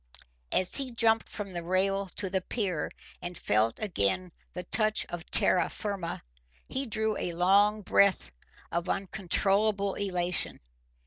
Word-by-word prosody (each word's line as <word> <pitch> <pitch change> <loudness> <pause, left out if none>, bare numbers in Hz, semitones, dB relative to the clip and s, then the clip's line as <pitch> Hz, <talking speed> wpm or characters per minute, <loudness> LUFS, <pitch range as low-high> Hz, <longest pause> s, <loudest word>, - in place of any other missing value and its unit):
As 185 - +3
he 275 -2 0
jumped 225 -2 +2
from 200 -3 -6
the 175 - -3
rail 195 +3 0
to 200 - -2
the 190 0 -1
pier 185 -6 -2 0.3
and 175 -1 -6
felt 110 +2 +1
again 180 - 0 0.2
the 180 - -5
touch 215 +3 +1
of 175 0 -6
terra 180 -2 +4
firma 200 -5 -4 0.4
he 265 +1 -1
drew 220 -1 +1
a 175 - -2
long 200 +4 +3
breath 190 - +3 0.4
of 170 +1 -2
uncontrollable 195 +1 +1
elation. 180 -3 -2
195 Hz, 135 wpm, -29 LUFS, 175-210 Hz, 0.4 s, terra